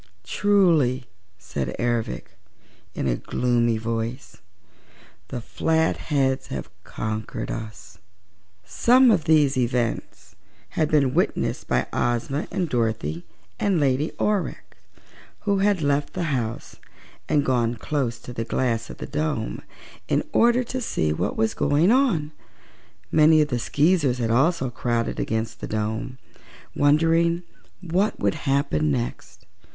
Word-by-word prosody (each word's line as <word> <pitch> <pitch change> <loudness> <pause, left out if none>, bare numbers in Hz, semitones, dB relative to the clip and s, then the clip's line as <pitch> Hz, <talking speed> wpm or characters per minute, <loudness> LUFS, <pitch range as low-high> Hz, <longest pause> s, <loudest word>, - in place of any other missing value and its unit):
"Truly," 160 - +2 0.3
said 80 -7 -4
Ervic, 120 -2 -2 0.6
in - - -2
a - - +1
gloomy 120 -2 +1
voice, 115 +3 -4 0.9
"the 120 - -5
Flatheads 140 -2 0
have 65 - -6
conquered 110 0 -4
us!" 110 -2 -8 0.7
Some 250 - +5
of 180 -7 +2
these 150 -4 +4
events 120 -1 -2 0.4
had 155 -1 0
been 140 -4 +3
witnessed 175 +5 0
by - - +1
Ozma 120 +5 -1
and 185 -3 -1
Dorothy 110 - -2 0.3
and 195 -4 +2
Lady 140 +2 +1
Aurex, 210 -2 -2 0.7
who 200 -2 +1
had 200 -4 +2
left 145 0 0
the - - -2
house 115 -3 -4 0.5
and 145 -1 +2
gone 120 -2 +1
close 125 -1 -2
to 125 - -9
the 115 - -3
glass 115 -1 -1
of - - -9
the - - -6
dome, 150 -5 -2 0.5
in - - +1
order 240 +2 +4
to 255 +2 -4
see 80 - 0
what - - -2
was 110 0 +1
going 155 +8 +3
on. 225 - +2 0.8
Many 155 0 +6
of 150 - -5
the 125 -3 -1
Skeezers 145 +1 +2
had 115 -2 -1
also 135 +1 +2
crowded 120 -1 -1
against 110 0 -2
the - - -4
dome, 110 +4 -3 0.6
wondering 165 +4 +3 0.4
what 185 +4 0
would 100 -1 +1
happen 135 - 0
next. - - -4
135 Hz, 125 wpm, -24 LUFS, 115-160 Hz, 0.9 s, Many